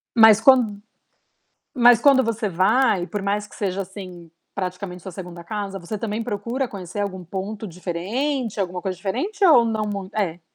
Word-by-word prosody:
Mas 220 -2 +8
quan 225 -6 +4 0.9
mas 240 -2 +6
quando 275 -2 +6
você 225 -2 -1
vai, 195 +1 +2
por 205 -2 -4
mais 205 +1 -1
que - - -16
seja, 195 -1 -2
assim, 180 -3 -10 0.2
praticamente 180 -1 -5
sua 190 - -8
2ª 175 -1 -8
casa, 200 0 -5
você 190 +5 -5
também 215 +1 -3
procura 235 +4 -3
conhecer 195 -1 -7
algum 190 -3 -3
ponto 200 +5 -5
diferente, 210 - -3
alguma 180 -2 -2
coisa 185 -2 -3
diferente 285 - -3
ou 285 -9 +7
não 220 -2 -1
muit 200 -2 -5
é. 180 -5 -2
205 Hz, 165 wpm, -22 LUFS, 185-230 Hz, 0.9 s, Mas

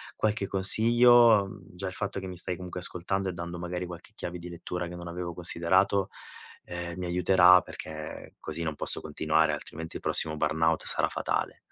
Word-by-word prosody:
qualche 105 -2 -1
consiglio. 115 +2 +6
Mhmm, 95 -2 -14
già 95 +2 -6
il 90 - -6
fatto 100 0 -4
che 95 - -8
mi 90 -1 -8
stai 90 +1 -3
comunque 90 0 -8
ascoltando 95 +2 -2
e - - -5
dando 85 0 -7
magari 90 +1 -5
qualche 90 +4 -11
chiave 90 -3 -6
di 90 +1 -9
lettura 90 +1 -6
che 90 - -9
non 85 0 -9
avevo 85 0 -6
considerato, 95 +3 0 0.5
ehm, 85 0 -7
mi 90 - -5
aiuterà 90 0 +5
perché 75 -1 -10
così 85 +2 -5
non 80 -2 -3
posso - - +1
continuare, 80 0 0
altrimenti 80 +2 -7
il - - -14
prossimo 80 -1 +3
burnout 80 +2 0
sarà - - +1
fatale. - - -3
90 Hz, 185 wpm, -27 LUFS, 85-95 Hz, 0.5 s, consiglio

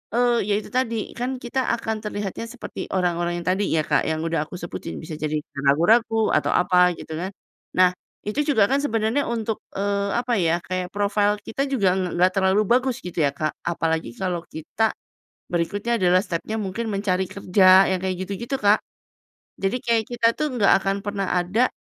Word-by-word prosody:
eee, 245 0 +3
ya 210 - +2
itu 210 - -6
tadi, 230 -4 -1
kan 250 +2 -3
kita 245 +1 -3 0.2
akan 220 -1 -3
terlihatnya 210 0 -4
seperti 250 +1 -9 0.2
orang-orang 175 -1 0
yang 170 - -6
tadi 190 +3 +1
ya 160 -1 +1
Kak, 150 - +2
yang 160 0 -1
udah 165 -2 -1
aku - - -8
sebutin, 175 -1 -6
bisa 160 0 -7
jadi 155 0 -2 0.3
ragu-ragu 220 +9 +3
atau - - +2
apa 180 0 +4
gitu - - -8
kan. 185 - -3 0.5
Nah, 180 -1 +5 0.3
itu 210 +7 -2
juga 220 -8 +5
kan 275 - +3
sebenarnya 230 0 0
untuk, 225 -2 -2 0.2
eee, 200 0 0
apa 240 0 -1
ya, 165 0 +2
kayak 185 0 -3
profil 205 0 +2
kita 275 +4 -2
juga 200 -9 +2
ng 185 -2 -2
nggak 180 +1 +4
terlalu 190 +2 +3
bagus 250 +3 +2
gitu 180 -1 -5
ya 145 - +4
Kak, 155 -1 -1
apalagi 160 -4 -1
kalau 180 -2 -2
kita 205 +8 -1 0.6
berikutnya 200 +7 -1
adalah 180 -2 +4
stepnya 200 +6 -3
mungkin 215 +3 -3
mencari 195 -2 0
kerja 190 0 +5
yang 190 - +1
kayak 190 -1 -1
gitu-gitu 235 +8 -4
Kak. 205 -2 +3 0.8
Jadi 195 +5 0
kayak 230 -2 +2
kita 235 -1 +2
tuh 305 +6 -2
nggak 210 -5 +4
akan 195 0 0
pernah 200 -2 -2
ada 185 +8 +2
200 Hz, 180 wpm, -23 LUFS, 180-225 Hz, 0.8 s, Nah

